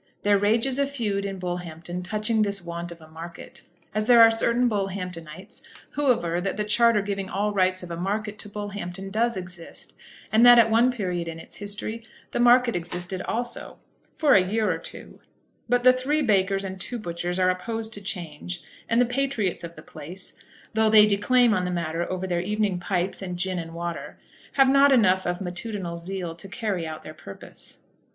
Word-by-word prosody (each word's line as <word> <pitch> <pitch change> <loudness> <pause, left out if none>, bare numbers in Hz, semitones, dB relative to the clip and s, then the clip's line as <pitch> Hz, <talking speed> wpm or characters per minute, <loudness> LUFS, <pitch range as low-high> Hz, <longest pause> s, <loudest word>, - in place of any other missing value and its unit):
There 205 -1 +4
rages 230 +6 +2
a 280 - +2
feud 210 -8 -2
in 195 -1 -4
Bullhampton 175 -1 -5
touching 215 +4 0
this 200 -1 +1
want 170 0 -5
of 170 -1 -11
a 155 - -13
market, 165 +2 -10 0.3
as 215 +1 0
there 240 -1 +7
are 225 0 +9
certain 235 +2 +2
Bullhamptonites 185 -5 -4 0.3
who 285 -2 +2
aver 175 -6 0
that 195 +2 -2
the 210 - 0
charter 215 0 +4
giving 195 -1 -3
all 205 +2 -1
rights 185 -1 +2
of 175 - -8
a - - -3
market 210 +4 -3
to 205 - -7
Bullhampton 200 -2 -6
does 230 +1 +1
exist; 180 -2 -8 0.4
and 220 +2 +5
that 245 0 +10
at 225 -1 +6
one 235 +3 +5
period 180 -7 -3
in 165 -1 -5
its 165 - -10
history 210 +2 -4 0.3
the - - -2
market 245 0 +5
existed 180 +2 -3
also, 240 +1 -3 0.4
for 295 -3 +4
a 195 - +7
year 210 +4 0
or - - -2
two; - - -10 0.5
but 245 0 +2
the 255 0 +8
three 285 +4 0
bakers 195 -4 +2
and 190 -1 -6
two 245 - -4
butchers 175 -3 -3
are 185 0 +4
opposed 220 +4 -4
to 205 - -7
change; 175 -2 -4 0.3
and 230 - +3
the 245 - +5
patriots 245 -7 -1
of 170 0 -7
the - - -12
place, 170 +5 -9 0.4
though 220 0 +3
they 215 -1 +8
declaim 220 +3 +4
on 185 -3 +1
the 180 - -1
matter 170 -1 -2
over 185 0 -2
their 175 -2 0
evening 205 -1 0
pipes 180 +1 -2
and 180 -2 -4
gin 185 0 -1
and 165 0 -7
water, 170 0 -5 0.4
have 270 -1 +5
not 275 +1 +6
enough 190 -8 +4
of 175 0 -1
matutinal 180 -1 -4
zeal 175 0 -4
to 175 +4 -9
carry 195 -6 -3
out 155 0 -7
their 155 - -9
purpose. 100 -9 -9
195 Hz, 195 wpm, -25 LUFS, 175-225 Hz, 0.5 s, that